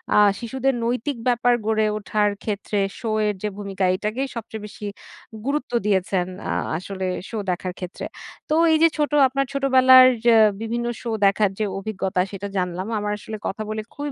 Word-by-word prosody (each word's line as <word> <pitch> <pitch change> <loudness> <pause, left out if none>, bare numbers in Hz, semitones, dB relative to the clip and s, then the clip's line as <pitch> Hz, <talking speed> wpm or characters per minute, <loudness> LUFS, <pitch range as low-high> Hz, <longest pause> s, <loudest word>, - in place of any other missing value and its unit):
আ - - +5 0.2
শিশুদের 265 +3 -1
নৈতিক 250 +3 -1
ব্যাপার 245 0 +3
গড়ে 220 0 +2
ওঠার 210 0 +1
ক্ষেত্রে 205 -1 -2 0.2
শো 225 - -3 0.2
এর 210 - +1
যে - - +1
ভূমিকা, 195 -2 -4
এটাকেই 220 +8 -2
সবচেয়ে 220 -1 -6
বেশি 210 0 -9 0.6
গুরুত্ব 280 -2 -2
দিয়েছেন 190 -2 +1 0.2
আ - - 0 0.3
আসলে 190 +2 -5 0.2
শো 225 - -5
দেখার 180 0 -3
ক্ষেত্রে। 180 0 -6 0.4
তো - - +1 0.2
এই 315 - +5
যে - - +9
ছোট 295 0 0 0.2
আপনার 275 +1 -1
ছোটবেলার 260 -2 +7 0.2
যে 235 - +6 0.3
বিভিন্ন 235 +1 -2 0.2
শো 235 - -5 0.2
দেখার 200 +1 +3
যে 215 - +1
অভিজ্ঞতা, 195 -2 -3
সেটা 200 0 -5
জানলাম। 180 +2 -2
আমার 210 0 -2
আসলে 215 +1 -7
কথা 215 - -4
বলে 215 0 -2
খুবই 290 0 -4
215 Hz, 170 wpm, -23 LUFS, 200-250 Hz, 0.6 s, যে